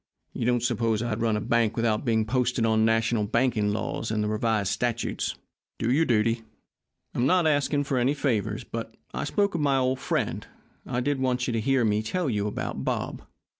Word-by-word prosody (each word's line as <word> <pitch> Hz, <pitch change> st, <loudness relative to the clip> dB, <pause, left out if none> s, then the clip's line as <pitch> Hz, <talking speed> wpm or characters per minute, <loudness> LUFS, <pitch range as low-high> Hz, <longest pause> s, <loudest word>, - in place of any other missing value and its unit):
"You 115 Hz, -, -2 dB
don't 120 Hz, -1 st, +2 dB
suppose 115 Hz, -2 st, +1 dB
I'd 115 Hz, -1 st, -2 dB
run 110 Hz, -2 st, +2 dB
a -, -, -1 dB
bank 115 Hz, 0 st, +1 dB
without 115 Hz, -2 st, +1 dB
being 110 Hz, -2 st, +2 dB
posted 125 Hz, 0 st, +1 dB
on 110 Hz, -1 st, +3 dB
national 115 Hz, -1 st, +2 dB
banking 115 Hz, -2 st, +1 dB
laws 105 Hz, -, -3 dB
and 105 Hz, -1 st, 0 dB
the -, -, 0 dB
revised 110 Hz, -1 st, 0 dB
statutes! 120 Hz, +1 st, -1 dB, 0.4 s
Do 115 Hz, -, 0 dB
your 155 Hz, +5 st, +3 dB
duty. 115 Hz, -1 st, +2 dB, 0.7 s
I'm 120 Hz, -, +1 dB
not 180 Hz, +2 st, +3 dB
asking 145 Hz, -1 st, +2 dB
any 130 Hz, +2 st, +2 dB
favours. 120 Hz, -9 st, -1 dB
But, -, -, -6 dB, 0.2 s
I 65 Hz, +3 st, -2 dB
spoke 200 Hz, -1 st, +1 dB
of 165 Hz, -, -1 dB
my 135 Hz, -3 st, +2 dB
friend. 130 Hz, -, -2 dB, 0.4 s
I 125 Hz, -1 st, -1 dB
did 145 Hz, +1 st, 0 dB
want 125 Hz, -1 st, 0 dB
you 120 Hz, -, -2 dB
to 115 Hz, -, 0 dB
hear 135 Hz, 0 st, +2 dB
me 105 Hz, 0 st, +2 dB
tell 150 Hz, +6 st, -1 dB
you 105 Hz, -1 st, 0 dB
about 105 Hz, -, -4 dB
Bob." -, -, -2 dB
115 Hz, 190 wpm, -26 LUFS, 110-130 Hz, 0.7 s, on